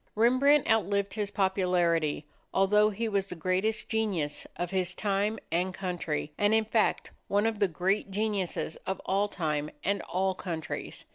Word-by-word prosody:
Rembrandt 255 +6 +4
outlived 200 -2 +1
his 210 -2 -2
popularity, 180 -6 +1 0.3
although 210 +2 +4
he 220 +3 -2
was 200 -2 0
the 180 - -5
greatest 185 +6 0
genius 200 -10 -1
of 175 0 -3
his 185 -1 0
time 205 +2 0
and 180 +3 0
country, 170 -5 -3
and 205 +1 +4
in 220 0 +2
fact 220 0 +1 0.2
one 205 +2 +2
of 225 -2 0
the 200 - +4
great 190 +4 0
geniuses 200 -5 -2
of 190 0 -2
all 200 +2 +1
time 150 -6 -2
and 200 +1 0
all 190 +2 +1
countries. 170 -4 -5
195 Hz, 155 wpm, -29 LUFS, 180-210 Hz, 0.3 s, Rembrandt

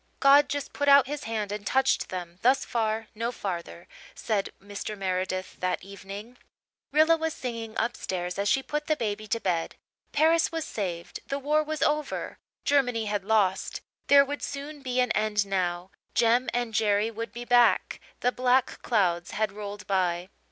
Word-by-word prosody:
"God 285 +1 +6
just 285 0 -3
put 285 - -1
out 280 -1 +8
His 290 +2 -5
hand 215 -3 -2
and 210 0 -4
touched 265 +6 +2
them 175 -1 -6
'thus 260 +3 +3
far 225 -1 -1
no 230 +2 -2
farther'," 185 -7 -5 0.3
said 205 -3 -1
Mr. 205 +1 -6
Meredith 185 -1 -2
that 185 0 -1
evening. 200 +4 -9 0.5
Rilla 310 +3 +5
was 320 0 -2
singing 230 -3 -5
upstairs 185 -6 -2
as 200 0 +1
she 270 +3 +2
put 300 +2 -3
the 310 - +2
baby 215 -4 -3
to 230 +3 0
bed. 175 -5 -1 0.4
Paris 320 +2 +3
was 325 -1 -3
saved 175 -5 -4
the 275 - -2
war 295 +2 +2
was 305 -1 -2
over 300 0 -1 0.3
Germany 245 -6 +2
had 205 -1 -1
lost 195 -3 +1 0.3
there 280 0 +7
would 290 +1 -5
soon 285 +1 -6
be 255 -1 -1
an 250 - +1
end 210 -1 +1
now 180 -2 -2 0.2
Jem 235 +2 +3
and 240 -2 -2
Jerry 210 +1 +2
would 230 +1 -5
be 240 0 -7
back. 245 -1 +4 0.2
The 250 - +3
black 250 0 +1
clouds 180 -7 +1
had 215 -1 +1
rolled 205 -1 -7
by. 180 -2 0
225 Hz, 170 wpm, -27 LUFS, 195-270 Hz, 0.5 s, out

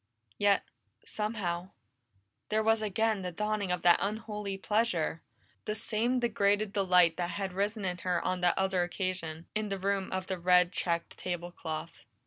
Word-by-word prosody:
Yet 205 -1 +4 0.4
somehow 190 -5 -2 0.8
there 220 +1 +2
was 225 0 +3
again 215 0 +1
the 180 -1 -3
dawning 210 0 -1
of 180 -1 -1
that 175 -1 +6
unholy 210 -1 -3
pleasure 195 -6 0 0.4
the 210 - -2
same 230 +3 0
degraded 205 -3 +1
delight 180 -4 +4
that 175 -1 -1
had 195 -1 -3
risen 205 +2 -1
in 180 -1 -2
her 180 0 0
on 185 -1 0
that 175 0 +3
other 190 -1 +2
occasion, 175 -3 -3
in 215 -1 -1
the 195 - -2
room 195 0 -1
of 185 0 -2
the 185 -1 -3
red 180 0 +5
checked 170 -2 -2
table 175 -1 -4
cloth. 160 -1 -6
190 Hz, 160 wpm, -31 LUFS, 180-210 Hz, 0.8 s, that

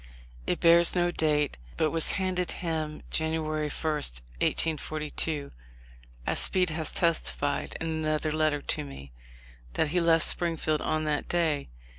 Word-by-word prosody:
It - - 0
bears 170 +1 +6
no 175 0 +2
date, 150 - +1 0.2
but 155 - +2
was 165 -1 +2
handed 185 -2 -1
him 155 -3 -3
January 155 -1 -1
1, 155 +2 -1
1812, 150 - -1 0.7
as - - +1
Speed 180 -3 +1
has 160 0 -2
testified, 145 -4 0
in 165 - -3
another 155 -1 -1
letter 155 -2 +1
to 150 - -1
me, 70 - -10 0.6
that 160 - +1
he 175 +3 +2
left 165 -1 +4
Springfield 165 -3 0
on 155 0 0
that 150 -1 -1
day. 160 -5 0
155 Hz, 135 wpm, -28 LUFS, 150-165 Hz, 0.7 s, bears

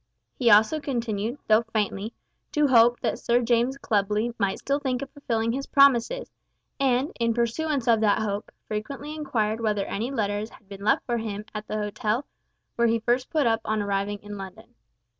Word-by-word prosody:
He 245 -3 +2
also 220 +9 +5
continued, 235 -4 -2
though 215 +1 +5
faintly, 215 -1 -2 0.4
to 300 0 +3
hope 240 -1 +5
that 225 - -1
Sir 235 +1 +2
James 240 +2 +1
Clubley 210 0 0
might 195 -2 +1
still 280 +1 -1
think 260 -3 -2
of 275 - -9
fulfilling 230 -6 -1
his 270 +3 -3
promises, 280 - +3 0.5
and, 265 +1 +2
in 230 -1 +1
pursuance 255 +3 -1
of 230 -2 +5
that 210 -2 +4
hope, 205 -1 -3 0.2
frequently 275 +8 -5
inquired 230 -8 -1
whether 210 -3 0
any 225 +5 -3
letters 210 -4 -2
had 210 - -19
been 200 0 -10
left 210 - +2
for 240 -1 -1
him 210 -2 -4
at 215 0 -6
the 215 - -3
hotel 215 +4 -1 0.5
where 235 0 +4
he 230 0 +2
first 240 +3 0
put 305 -4 +1
up 225 -1 +2
on 215 0 -1
arriving 200 0 -1
in 205 -1 -7
London. 190 -1 -10
230 Hz, 180 wpm, -26 LUFS, 210-255 Hz, 0.5 s, also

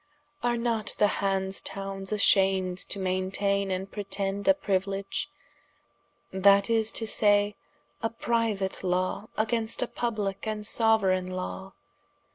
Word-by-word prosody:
Are 240 0 +1
not 230 -3 -2
the 210 - +5 0.2
Hanse 195 -1 0
townes 195 0 -5
ashamed 190 -3 +3
to - - -1
maintaine 195 +1 0
and 190 +1 -3
pretend 200 -1 -3
a 290 - +6
priuiledge, 195 -5 -2 1.1
that 200 +3 +5
is 225 -1 +2
to 225 - 0
say, 205 -1 +2 0.5
a 225 - 0
priuate 225 -5 -1
lawe 185 +3 -1
against 225 +1 0
a - - -2
publike 215 -5 -3
and 215 -1 -3
soueraigne 205 -5 +2
lawe? 185 +1 -6
200 Hz, 120 wpm, -28 LUFS, 190-220 Hz, 1.1 s, a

